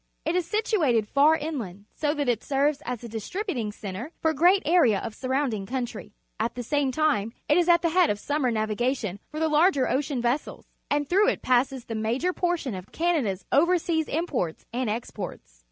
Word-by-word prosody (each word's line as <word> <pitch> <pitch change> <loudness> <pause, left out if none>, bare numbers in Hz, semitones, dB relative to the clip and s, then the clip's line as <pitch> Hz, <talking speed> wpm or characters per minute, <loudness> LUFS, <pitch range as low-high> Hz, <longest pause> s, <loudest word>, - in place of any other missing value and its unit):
It 325 - 0
is 360 -2 0
situated 340 - +1
far 290 +6 +5
inland, 230 - -5
so 300 0 -1
that 290 -2 -1
it 235 -3 +1
ser 280 +1 +2
ves 300 - -6
as 245 -2 -4
a - - -6
distributing 235 - -3
cen 200 -2 -7
tre 235 +10 -6
foFa 320 0 +3
gre 330 +5 +4
at 390 - -2
area 305 - +4
of 210 - -5
surround 260 +1 -1
ing 195 -2 -4
coimtry. 240 -5 -4 0.3
At 225 +2 -1
the 245 - -4
same 285 +2 0
time, 260 -7 +1
it 295 - +4
is 350 0 +3
at 340 0 +5
the 335 - +3
head 360 0 +4
of 205 - 0
sunuuer 285 +2 0
navigation 220 -1 -1
for 305 - -6
the 320 - +2
larger 305 -3 +3
ocean 270 -1 -1
vessels, 240 +5 -2 0.2
and 290 0 0
t 350 - -1
hrough 420 +5 +5
it - - -6
passes 255 0 +1
the 225 - -5
major 235 +11 0
j)ortipn 315 - -2
oLCaaada's 245 - -1
overseas 330 0 +2
imp 330 +2 -2
orts 175 -10 -2
and 245 -1 -1
exports. 205 - -6
270 Hz, 205 wpm, -26 LUFS, 225-320 Hz, 0.3 s, far